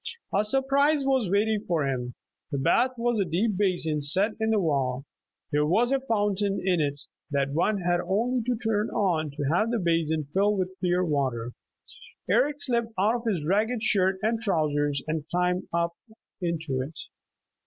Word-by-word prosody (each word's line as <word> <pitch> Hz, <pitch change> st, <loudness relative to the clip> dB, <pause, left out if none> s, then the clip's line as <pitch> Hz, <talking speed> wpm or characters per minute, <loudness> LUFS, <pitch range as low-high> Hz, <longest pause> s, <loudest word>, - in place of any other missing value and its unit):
A 200 Hz, -, +3 dB
surprise 275 Hz, +5 st, +2 dB
was 260 Hz, -7 st, +1 dB
waiting 210 Hz, +2 st, +1 dB
for 165 Hz, -5 st, +1 dB
him. 125 Hz, -2 st, -3 dB, 0.4 s
The 140 Hz, -, -1 dB
bath 245 Hz, -, +2 dB
was 235 Hz, -1 st, 0 dB
a -, -, +3 dB
deep 190 Hz, +5 st, 0 dB
basin 175 Hz, -6 st, 0 dB
set 185 Hz, +9 st, +3 dB
in 220 Hz, -, +1 dB
the 220 Hz, -, +3 dB
wall. 135 Hz, -6 st, 0 dB, 0.5 s
There 150 Hz, 0 st, +2 dB
was 235 Hz, -, +2 dB
a 275 Hz, -, +2 dB
fountain 205 Hz, -5 st, 0 dB
in 180 Hz, -4 st, +2 dB
it 145 Hz, -1 st, -2 dB, 0.3 s
that 140 Hz, -1 st, 0 dB
one 190 Hz, +7 st, +1 dB
had 175 Hz, 0 st, +1 dB
only 240 Hz, +6 st, +1 dB
to 250 Hz, -, +1 dB
turn 220 Hz, -2 st, 0 dB
on 165 Hz, -6 st, 0 dB
to 145 Hz, +1 st, -5 dB
have 215 Hz, +6 st, +2 dB
the 235 Hz, -, 0 dB
basin 165 Hz, -4 st, 0 dB
fill 205 Hz, +2 st, +2 dB
with 185 Hz, -1 st, -1 dB
clear 180 Hz, 0 st, +1 dB
water. 130 Hz, -6 st, -1 dB, 0.8 s
Eric 290 Hz, +1 st, +2 dB
slipped 235 Hz, -4 st, -1 dB
out 210 Hz, +4 st, +3 dB
of 235 Hz, -, -10 dB
his 165 Hz, -7 st, -2 dB
ragged 215 Hz, +6 st, +1 dB
shirt 190 Hz, -3 st, +2 dB
and 225 Hz, +1 st, +1 dB
trousers 145 Hz, -8 st, 0 dB
and 155 Hz, -1 st, -3 dB
climbed 180 Hz, +1 st, 0 dB
up 170 Hz, 0 st, 0 dB, 0.5 s
into 160 Hz, -6 st, -2 dB
it. 150 Hz, +5 st, -7 dB
185 Hz, 175 wpm, -26 LUFS, 155-220 Hz, 0.8 s, A